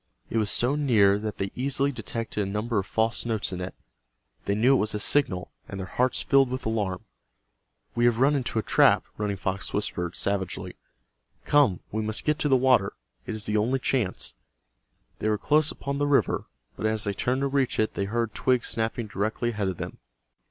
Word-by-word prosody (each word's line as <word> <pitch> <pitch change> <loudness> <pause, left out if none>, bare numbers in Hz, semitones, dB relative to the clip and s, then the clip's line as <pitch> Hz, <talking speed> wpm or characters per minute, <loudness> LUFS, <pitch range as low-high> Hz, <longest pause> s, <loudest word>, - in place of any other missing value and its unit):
It 115 - +1
was 105 -2 +1
so 125 +3 +2
near 110 -9 +4
that 105 0 -4
they 95 0 -2
easily 140 +2 0
detected 115 -2 -4
a 100 - -2
number 105 +1 -1
of 95 - -4
false 110 +1 0
notes 110 -4 -2
in 90 - -4
it. 90 - -5 0.7
They 100 - +1
knew 120 +6 +4
it 135 - +4
was 105 0 -1
a - - -1
signal, 100 -7 +1 0.2
and 100 - -6
their 95 - -4
hearts 125 +6 0
filled 135 -2 +4
with 130 +1 -4
alarm. 105 -5 -2 0.9
"We 120 - +2
have 120 -2 +3
run 135 +4 +4
into 130 -5 -1
a 110 - +1
trap," - - +4
Running 105 -1 -2
Fox 95 +1 -3
whispered, 90 -4 -2
savagely. 100 -2 -2 0.7
"Come, 135 - +3
we 110 - -1
must 110 0 -2
get 150 0 +1
to 150 - +1
the 135 - +5
water. 125 -6 +3 0.3
It 110 - -3
is 110 -1 -1
the 105 0 +1
only 120 +6 +2
chance." 125 -7 -1 0.9
They 110 - 0
were 105 - +2
close 155 +6 +2
upon 140 0 -4
the 145 - +1
river, 145 -1 +2 0.3
but 110 - -1
as 110 0 +1
they 100 - -1
turned 125 +6 0
to 140 - +2
reach 135 -2 0
it 110 - +1
they 100 - -2
heard 115 +2 -1
twigs 125 -2 +1
snapping 115 +1 -1
directly 110 +3 -2
ahead 105 -3 -2
of 95 -2 -3
them. - - -6
110 Hz, 205 wpm, -26 LUFS, 100-130 Hz, 0.9 s, the